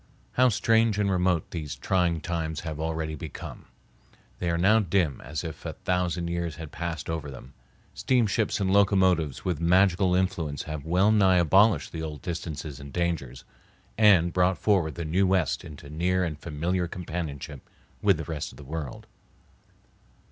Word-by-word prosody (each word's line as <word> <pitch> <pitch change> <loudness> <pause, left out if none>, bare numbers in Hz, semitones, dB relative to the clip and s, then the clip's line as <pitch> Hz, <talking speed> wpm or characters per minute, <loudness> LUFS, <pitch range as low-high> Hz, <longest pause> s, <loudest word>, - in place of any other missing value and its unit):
How 130 0 +4
strange 110 0 +2
and 100 -1 +1
remote 90 -3 +1
these 75 -4 -5
trying 90 -4 0
times 80 -2 -3
have 80 -2 -5
already 80 -1 -2
become! 75 - -8 0.7
They 90 - -1
are 85 - +1
now 100 +6 +5
dim 90 - 0
as 75 +2 -4
if 80 -3 -7
a - - -4
thousand 90 -1 -1
years 85 -2 -3
had 80 -1 -8
passed 85 -2 -4
over 80 -3 -3
them. 65 0 -11 0.4
Steamships 115 -4 +1
and 95 -1 +1
locomotives 95 -8 +3
with 90 -5 -1
magical 90 +1 +3
influence 90 -6 -1
have 75 -2 -6
well 90 +6 +3
nigh 95 -4 +4
abolished 95 +1 +4
the 80 - -5
old 75 -2 -6
distances 80 -4 -5
and 70 0 -10
dangers, 80 -7 -2 0.5
and 95 -6 +5
brought 90 0 +2
forward 90 -7 +1
the 85 - -4
New 90 +5 +2
West 90 -5 +1
into 75 -1 -11
near 90 +5 0
and 80 -4 -3
familiar 85 +4 -2
companionship 80 -5 -6 0.4
with 100 -4 +4
the 80 - -4
rest 75 -1 -5
of - - -16
the 75 - -11
world. 75 -2 -6
85 Hz, 160 wpm, -27 LUFS, 80-95 Hz, 0.7 s, now